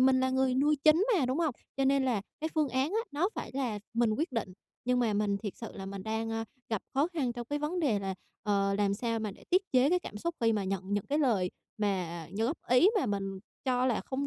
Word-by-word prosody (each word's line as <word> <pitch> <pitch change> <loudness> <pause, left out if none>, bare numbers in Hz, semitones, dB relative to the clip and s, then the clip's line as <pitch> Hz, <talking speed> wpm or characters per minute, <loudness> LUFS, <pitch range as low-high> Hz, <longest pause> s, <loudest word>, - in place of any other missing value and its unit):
mình 260 0 +5
là 260 0 +2
người 260 -1 +2
nuôi 295 +3 +3
chính 325 +8 +6
mà, 275 -8 +2
đúng 260 +5 0
hông? 310 -7 +1 0.2
Cho 270 - +2
nên 275 0 +3
là 230 -6 +1 0.2
cái 315 - -1
phương 305 -3 +2
án 260 +5 +1
á 440 - +1
nó 335 +7 +2
phải - - -5
là 245 -6 -1 0.2
mình 235 -1 +3
quyết 285 +6 -1
định, 205 -6 -2 0.3
nhưng 250 0 +2
mà 230 -3 +2
mình 205 -1 +1
thiệt 205 -2 -5
sự 230 - -7
là 195 -1 -6
mình 195 -1 -6
đang, 220 +1 -2
a, 225 0 -1 0.2
gặp 220 -3 -1
khó 280 +4 +3
khăn 285 -9 -1
trong 240 -1 -6
cái 290 +2 -1
vấn 320 +5 -1
đề 235 -10 +2
là, 195 -1 -3 0.3
ờ, 200 -2 +2
làm 200 -1 +2
sao 230 +1 -1
mà 215 -2 -2
để - - -15
tiết 370 +2 +5
chế 260 +3 +5
cái 360 - +4
cảm 210 - -8
xúc 340 +5 -2
khi 225 -1 +4
mà 205 -2 0
nhận 195 +1 -3
những 205 - -1
cái 290 +2 +1
lời 210 -11 +2 0.3
mà 180 -6 -1
như 220 +3 0
góp 295 - -2
ý 250 +10 +6
mà 260 - 0
mình 195 -2 -2 0.3
cho 255 -1 +2
là 245 - +1
không 275 +1 -3
245 Hz, 265 wpm, -31 LUFS, 205-275 Hz, 0.3 s, chính